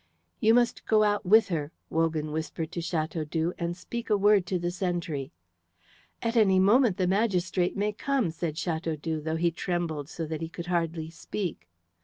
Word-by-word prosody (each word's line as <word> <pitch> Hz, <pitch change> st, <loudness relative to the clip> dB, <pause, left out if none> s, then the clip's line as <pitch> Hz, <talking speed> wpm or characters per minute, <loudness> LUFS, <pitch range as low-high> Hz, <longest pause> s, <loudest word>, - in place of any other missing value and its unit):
"You 220 Hz, +1 st, +5 dB
must 245 Hz, -1 st, +1 dB
go 215 Hz, -1 st, +5 dB
out 205 Hz, -2 st, +1 dB
with 220 Hz, +3 st, +6 dB
her," 155 Hz, -4 st, -2 dB, 0.2 s
Wogan 160 Hz, -2 st, 0 dB
whispered 160 Hz, +1 st, -4 dB
to 170 Hz, -, -3 dB
Chateaudoux, 160 Hz, 0 st, -1 dB
"and 170 Hz, 0 st, -2 dB
speak 235 Hz, +4 st, -6 dB
a 210 Hz, -, +4 dB
word 200 Hz, -2 st, +4 dB
to 185 Hz, -, 0 dB
the 175 Hz, 0 st, -2 dB
sentry." 170 Hz, -6 st, -3 dB, 0.9 s
"At 230 Hz, 0 st, -1 dB
any 200 Hz, -5 st, +5 dB
moment 210 Hz, +1 st, +4 dB
the 185 Hz, -, +1 dB
magistrate 185 Hz, -2 st, +1 dB
may 210 Hz, +1 st, 0 dB
come," 260 Hz, -4 st, 0 dB
said 160 Hz, -1 st, -4 dB
Chateaudoux, 160 Hz, -2 st, -2 dB
though 160 Hz, +1 st, -2 dB
he 170 Hz, +1 st, +2 dB
trembled 165 Hz, -4 st, -3 dB
so 165 Hz, -, -4 dB
that 155 Hz, 0 st, -4 dB
he 165 Hz, -, -3 dB
could 170 Hz, 0 st, -7 dB
hardly 165 Hz, -2 st, -1 dB
speak. 165 Hz, -, -5 dB
175 Hz, 175 wpm, -28 LUFS, 160-200 Hz, 0.9 s, with